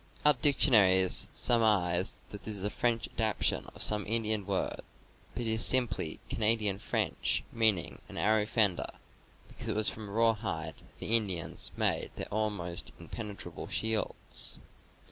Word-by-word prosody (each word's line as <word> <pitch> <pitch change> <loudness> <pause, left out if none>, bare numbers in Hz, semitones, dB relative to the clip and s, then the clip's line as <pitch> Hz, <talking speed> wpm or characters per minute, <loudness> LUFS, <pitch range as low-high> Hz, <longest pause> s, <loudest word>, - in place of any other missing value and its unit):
(Our 150 - +6
diction 135 0 +4
aries 95 -3 +5
surmise 95 -6 +1
that 105 - -9
this 110 -2 -6
is 95 - -7
a 105 - 0
French 115 -2 0
adaptation 110 -3 -1
of - - +2
some 105 -1 +3
Indian 110 -2 +2
word, 95 -2 -3 0.5
but 120 - -4
it - - -4
is 110 0 +2
simply 115 -11 +2
Canadian 105 -3 +2
French, - - -1
mean 110 -4 +2
ing 85 - -8
an - - -10
arrow 110 0 0
fender, 105 -6 +1 0.5
because - - -9
it - - -2
was 110 0 +1
from 110 -2 -9
rawhide 100 -8 -1
that - - -24
the 115 - +3
Indians 95 -7 0
made - - 0
their - - -6
almost 100 -5 -3
impenetrable 105 -4 -9
shields. 110 -1 -1
105 Hz, 150 wpm, -29 LUFS, 95-115 Hz, 0.5 s, Our